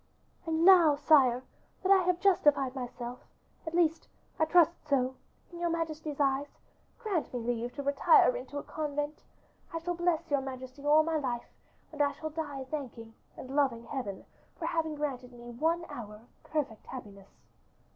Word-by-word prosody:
"And 325 Hz, +1 st, +1 dB
now, 350 Hz, -6 st, +8 dB
sire, 270 Hz, -4 st, +4 dB, 0.4 s
that 380 Hz, -, +2 dB
I 390 Hz, -1 st, +7 dB
have 360 Hz, -1 st, +1 dB
justified 295 Hz, -9 st, +3 dB
myself, 245 Hz, -1 st, -6 dB, 0.5 s
at 320 Hz, -, -3 dB
least 330 Hz, -2 st, +2 dB, 0.3 s
I 315 Hz, -, +4 dB
trust 335 Hz, 0 st, +5 dB, 0.2 s
so, 260 Hz, -3 st, +1 dB, 0.4 s
in 345 Hz, -, -9 dB
your 345 Hz, 0 st, 0 dB
majesty's 315 Hz, -3 st, -3 dB
eyes, 280 Hz, 0 st, 0 dB, 0.4 s
grant 410 Hz, -9 st, -2 dB
me 245 Hz, -, -3 dB
leave 240 Hz, +1 st, -2 dB
to 285 Hz, -, -4 dB
retire 285 Hz, -, +5 dB
into -, -, -6 dB
a 285 Hz, -, -4 dB
convent. 295 Hz, -1 st, -4 dB, 0.5 s
I 330 Hz, -, -3 dB
shall 340 Hz, +2 st, -2 dB
bless 340 Hz, -2 st, 0 dB
your 285 Hz, -1 st, +3 dB
majesty 260 Hz, 0 st, -8 dB
all 300 Hz, +2 st, +5 dB
my 325 Hz, 0 st, 0 dB
life, 250 Hz, -5 st, -2 dB, 0.5 s
and 300 Hz, -2 st, -3 dB
I 285 Hz, -1 st, +2 dB
shall 310 Hz, +2 st, -6 dB
die 290 Hz, -4 st, -4 dB
thanking 235 Hz, -6 st, -6 dB, 0.2 s
and 265 Hz, +1 st, -7 dB
loving 265 Hz, -5 st, +2 dB
Heaven 230 Hz, -6 st, -5 dB, 0.3 s
for -, -, -4 dB
having 320 Hz, -2 st, -1 dB
granted 260 Hz, -4 st, -4 dB
me 240 Hz, 0 st, -10 dB
one 325 Hz, +7 st, 0 dB
hour 210 Hz, -3 st, -8 dB
of 225 Hz, +3 st, -21 dB
perfect 285 Hz, -8 st, -3 dB
happiness." 200 Hz, -6 st, -10 dB
290 Hz, 165 wpm, -30 LUFS, 255-325 Hz, 0.5 s, now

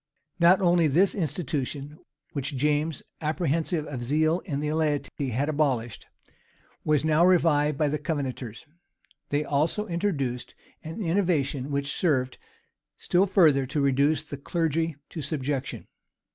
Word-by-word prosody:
Not 175 Hz, +3 st, +6 dB
only 175 Hz, -3 st, +4 dB
this 175 Hz, +7 st, +3 dB
institution, 150 Hz, -, -3 dB, 0.3 s
which 140 Hz, -1 st, -3 dB
James, 150 Hz, +2 st, 0 dB, 0.2 s
apprehensive 160 Hz, 0 st, 0 dB
of 130 Hz, -5 st, -5 dB
zeal 155 Hz, +6 st, +2 dB
in 140 Hz, -5 st, -2 dB
the 150 Hz, +1 st, -1 dB
laity, 150 Hz, -3 st, -1 dB
had 130 Hz, +5 st, -1 dB
abolished, 135 Hz, -7 st, -1 dB, 0.8 s
was 150 Hz, -1 st, +2 dB
now 155 Hz, +1 st, +4 dB
revived 150 Hz, -5 st, +3 dB
by 150 Hz, -, +2 dB
the 150 Hz, +1 st, -1 dB
Covenanters; 135 Hz, -5 st, -4 dB, 0.6 s
they 145 Hz, +1 st, +1 dB
also 155 Hz, +9 st, 0 dB
introduced 165 Hz, -, -2 dB, 0.3 s
an 165 Hz, +7 st, -5 dB
innovation, 165 Hz, -7 st, 0 dB
which 140 Hz, 0 st, -1 dB
served 130 Hz, -7 st, 0 dB, 0.6 s
still 185 Hz, +3 st, +2 dB
further 155 Hz, -9 st, +4 dB
to 145 Hz, -, -2 dB
reduce 140 Hz, +3 st, +2 dB
the 145 Hz, -2 st, -7 dB
clergy 165 Hz, +1 st, -1 dB
to 160 Hz, -, -6 dB
subjection. 140 Hz, -2 st, -3 dB
150 Hz, 130 wpm, -26 LUFS, 140-165 Hz, 0.8 s, Not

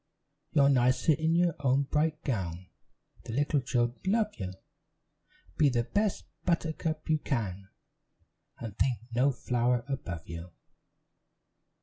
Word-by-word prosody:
"You're 140 Hz, -2 st, +5 dB
nicer 130 Hz, +3 st, +4 dB
in 160 Hz, +2 st, +1 dB
your 175 Hz, -1 st, +3 dB
own 135 Hz, 0 st, +3 dB
bright 150 Hz, +2 st, 0 dB
gown, 90 Hz, -, -3 dB, 0.6 s
The 115 Hz, -, -5 dB
little 145 Hz, +2 st, +2 dB
children 120 Hz, -1 st, 0 dB
love 210 Hz, +1 st, +2 dB
you; 95 Hz, -2 st, -3 dB, 1.1 s
Be 150 Hz, -, +5 dB
the 120 Hz, -2 st, +1 dB
best 205 Hz, -, 0 dB, 0.2 s
buttercup 160 Hz, -2 st, -1 dB
you 155 Hz, -1 st, +2 dB
can, 100 Hz, -9 st, -3 dB, 0.9 s
And 110 Hz, -4 st, -7 dB
think 120 Hz, +3 st, +2 dB, 0.2 s
no 130 Hz, +4 st, +4 dB
flower 120 Hz, -1 st, 0 dB
above 90 Hz, -, -4 dB
you. 85 Hz, +1 st, -7 dB
130 Hz, 120 wpm, -30 LUFS, 115-155 Hz, 1.1 s, You're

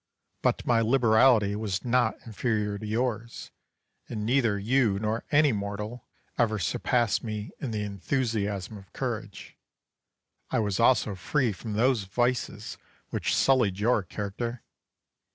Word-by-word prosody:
But -, -, +1 dB
my 115 Hz, -2 st, +3 dB
liberality 115 Hz, -3 st, +4 dB
was 105 Hz, -1 st, -3 dB
not 120 Hz, -2 st, +2 dB
inferior 105 Hz, -2 st, -1 dB
to 110 Hz, -, -6 dB
yours; 115 Hz, +1 st, -3 dB, 0.6 s
and 105 Hz, -3 st, -4 dB
neither 120 Hz, -4 st, +2 dB
you 110 Hz, 0 st, +2 dB
nor 110 Hz, +2 st, -2 dB
any 150 Hz, -1 st, +4 dB
mortal 105 Hz, +3 st, -5 dB, 0.3 s
ever 110 Hz, -2 st, +2 dB
surpassed 115 Hz, +6 st, 0 dB
me 110 Hz, -2 st, -5 dB
in 135 Hz, -, -4 dB
the 105 Hz, -2 st, -2 dB
enthusiasm 105 Hz, -1 st, -2 dB
of 95 Hz, -, -18 dB
courage. 115 Hz, -6 st, -5 dB, 0.9 s
I -, -, 0 dB
was 105 Hz, -2 st, 0 dB
also 115 Hz, -3 st, +3 dB
free 115 Hz, -, 0 dB
from 105 Hz, +3 st, -6 dB
those 115 Hz, -1 st, +2 dB
vices 120 Hz, 0 st, -2 dB, 0.3 s
which -, -, 0 dB
sullied 125 Hz, -8 st, +3 dB
your 110 Hz, +2 st, +2 dB
character. 110 Hz, +6 st, -5 dB
110 Hz, 130 wpm, -27 LUFS, 105-120 Hz, 0.9 s, liberality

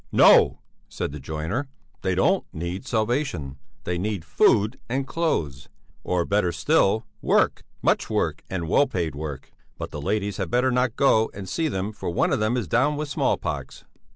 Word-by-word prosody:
"No," -, -, +6 dB, 0.3 s
said -, -, -4 dB
the 75 Hz, -, -7 dB
joiner, 80 Hz, -, -3 dB, 0.3 s
"they 95 Hz, -1 st, 0 dB
don't 180 Hz, -, +3 dB
need 85 Hz, +9 st, -5 dB
salvation, 110 Hz, -, -1 dB, 0.2 s
they 90 Hz, 0 st, -2 dB
need 100 Hz, -3 st, -3 dB
food 105 Hz, -, +3 dB
and 135 Hz, +2 st, -1 dB
clothes, 80 Hz, -, -2 dB, 0.3 s
or, 90 Hz, -2 st, 0 dB
better 100 Hz, -3 st, +1 dB
still, 110 Hz, -, +2 dB, 0.2 s
work; -, -, +2 dB, 0.2 s
much -, -, +2 dB
work -, -, 0 dB
and 85 Hz, -3 st, -3 dB
well 140 Hz, -, +4 dB
paid 85 Hz, -10 st, -2 dB
work. 70 Hz, -2 st, -6 dB, 0.3 s
But -, -, -6 dB
the 75 Hz, -, -6 dB
ladies 100 Hz, +4 st, -1 dB
had -, -, -3 dB
better 125 Hz, +2 st, +2 dB
not 125 Hz, -1 st, +1 dB
go 110 Hz, -6 st, +3 dB
and 95 Hz, -1 st, -7 dB
see 165 Hz, -, -1 dB
them, 100 Hz, -6 st, -2 dB
for 105 Hz, -, -5 dB
one 85 Hz, -, +1 dB
of -, -, +1 dB
them 110 Hz, +3 st, +1 dB
is 115 Hz, -7 st, -2 dB
down 130 Hz, -, +2 dB
with 150 Hz, 0 st, -3 dB
small 140 Hz, -, +1 dB
pox...." -, -, -5 dB
105 Hz, 180 wpm, -24 LUFS, 85-125 Hz, 0.3 s, No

